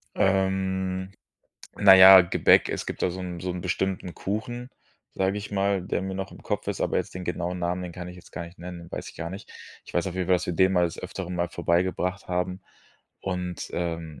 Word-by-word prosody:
Ähm, 95 Hz, -1 st, 0 dB, 0.7 s
na 100 Hz, -1 st, +8 dB
ja, 95 Hz, 0 st, +11 dB
Gebäck, 85 Hz, -, +4 dB
es -, -, -3 dB
gibt -, -, -5 dB
da 90 Hz, -, +2 dB
so 95 Hz, +1 st, -6 dB
'n 90 Hz, -2 st, -5 dB
so 90 Hz, -, -3 dB
'n 90 Hz, -, -5 dB
bestimmten 95 Hz, -1 st, -2 dB
Kuchen, 120 Hz, +5 st, -4 dB, 0.4 s
sage 95 Hz, +1 st, 0 dB
ich 105 Hz, -, -7 dB
mal, 100 Hz, -1 st, +1 dB
der 90 Hz, -, -2 dB
mir 95 Hz, 0 st, -4 dB
noch 95 Hz, -1 st, -4 dB
im -, -, -13 dB
Kopf -, -, -3 dB
ist, -, -, -3 dB
aber -, -, 0 dB
jetzt -, -, -2 dB
den 90 Hz, 0 st, -6 dB
genauen 90 Hz, +1 st, -3 dB
Namen, 90 Hz, +1 st, -1 dB
den 90 Hz, -1 st, -6 dB
kann 90 Hz, 0 st, -7 dB
ich 90 Hz, -, -10 dB
jetzt 90 Hz, -, -15 dB
gar 85 Hz, +1 st, -5 dB
nicht 85 Hz, +2 st, -14 dB
nennen, 90 Hz, 0 st, -7 dB
den 85 Hz, 0 st, -12 dB
weiß -, -, -5 dB
ich -, -, -13 dB
gar 85 Hz, 0 st, -5 dB
nicht. 95 Hz, +3 st, -9 dB, 0.3 s
Ich -, -, -13 dB
weiß 85 Hz, +1 st, +1 dB
auf 90 Hz, -, -4 dB
jeden 90 Hz, -2 st, -2 dB
Fall, 90 Hz, -1 st, +4 dB
dass 90 Hz, -, -5 dB
wir 90 Hz, -, -1 dB
den 95 Hz, +2 st, +4 dB
mal 90 Hz, -1 st, +3 dB
des 85 Hz, -, -3 dB
Öfteren 90 Hz, -1 st, -5 dB
mal 85 Hz, 0 st, -1 dB
vorbeigebracht 90 Hz, +2 st, -1 dB
haben. 90 Hz, +1 st, -2 dB, 0.6 s
Und, 90 Hz, -2 st, -4 dB
ähm, 80 Hz, -3 st, -4 dB
90 Hz, 230 wpm, -26 LUFS, 85-95 Hz, 0.7 s, ja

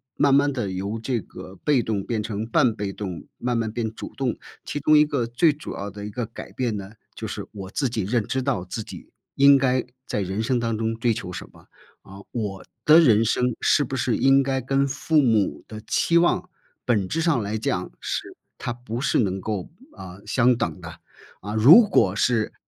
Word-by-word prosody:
慢 140 Hz, -1 st, +3 dB
慢 145 Hz, +1 st, +4 dB
地 120 Hz, -7 st, -2 dB
由 100 Hz, +4 st, -4 dB
这 120 Hz, 0 st, -1 dB
个 95 Hz, 0 st, -11 dB
被 145 Hz, -4 st, +3 dB
动 110 Hz, -3 st, -2 dB
变 115 Hz, 0 st, -2 dB
成 105 Hz, 0 st, -4 dB
半 115 Hz, 0 st, +2 dB
被 100 Hz, -2 st, -4 dB
动， 95 Hz, -5 st, -6 dB
慢 120 Hz, -1 st, -1 dB
慢 115 Hz, -1 st, -1 dB
变 110 Hz, -1 st, -3 dB
主 -, -, -8 dB
动， 130 Hz, -4 st, -1 dB, 0.3 s
其 145 Hz, -, -4 dB
中 155 Hz, +2 st, +4 dB
一 150 Hz, -, +6 dB
个 140 Hz, -5 st, -1 dB
最 120 Hz, +8 st, +3 dB
主 150 Hz, +3 st, -8 dB
要 100 Hz, +1 st, -5 dB
的 100 Hz, +1 st, -8 dB
一 -, -, -5 dB
个 120 Hz, +3 st, -3 dB
改 115 Hz, -, -10 dB
变 120 Hz, -5 st, -2 dB
呢， 100 Hz, 0 st, -8 dB, 0.2 s
就 -, -, -5 dB
是 -, -, -6 dB
我 95 Hz, -2 st, -8 dB
自 135 Hz, +3 st, -1 dB
己 115 Hz, -2 st, -2 dB
认 110 Hz, +2 st, 0 dB
知 130 Hz, -, -1 dB
到 125 Hz, -9 st, -1 dB
自 90 Hz, +5 st, -5 dB
己， -, -, -11 dB, 0.3 s
应 140 Hz, 0 st, +7 dB
该 130 Hz, -2 st, +1 dB, 0.2 s
在 105 Hz, -, -2 dB
人 95 Hz, +3 st, -2 dB
生 125 Hz, +2 st, +1 dB
当 115 Hz, -1 st, -1 dB
中 115 Hz, +1 st, -1 dB
追 115 Hz, 0 st, +1 dB
求 100 Hz, -5 st, -6 dB
什 -, -, -8 dB
么。 -, -, -20 dB, 0.4 s
呃， 100 Hz, +1 st, -13 dB
我 105 Hz, -5 st, -4 dB, 0.2 s
的 155 Hz, +2 st, +8 dB
人 115 Hz, -8 st, +5 dB
生 125 Hz, +1 st, +1 dB
是 145 Hz, -, +3 dB
不 135 Hz, -, -4 dB
是 130 Hz, -2 st, 0 dB
应 135 Hz, +1 st, +4 dB
该 135 Hz, 0 st, -1 dB
跟 135 Hz, +2 st, +1 dB
父 145 Hz, +3 st, +1 dB
母 110 Hz, -7 st, +1 dB
的 110 Hz, -1 st, -8 dB
期 170 Hz, 0 st, +3 dB
望 175 Hz, +1 st, +1 dB, 0.4 s
本 105 Hz, -6 st, +1 dB
质 165 Hz, -, -1 dB
上 160 Hz, -7 st, +2 dB
来 105 Hz, +1 st, -3 dB
讲 110 Hz, -, -2 dB
是 -, -, -4 dB, 0.2 s
它 -, -, -3 dB
不 120 Hz, 0 st, -6 dB
是 -, -, +1 dB
能 95 Hz, -3 st, 0 dB
够， 100 Hz, -2 st, -4 dB, 0.3 s
呃， 90 Hz, +1 st, -10 dB
相 125 Hz, +3 st, +3 dB
等 105 Hz, -, -3 dB
的。 85 Hz, -1 st, -10 dB, 0.4 s
呃， 105 Hz, +2 st, -5 dB
如 160 Hz, -, +8 dB
果 95 Hz, -, +3 dB
是 115 Hz, 0 st, +1 dB
115 Hz, 230 characters per minute, -24 LUFS, 105-135 Hz, 0.4 s, 的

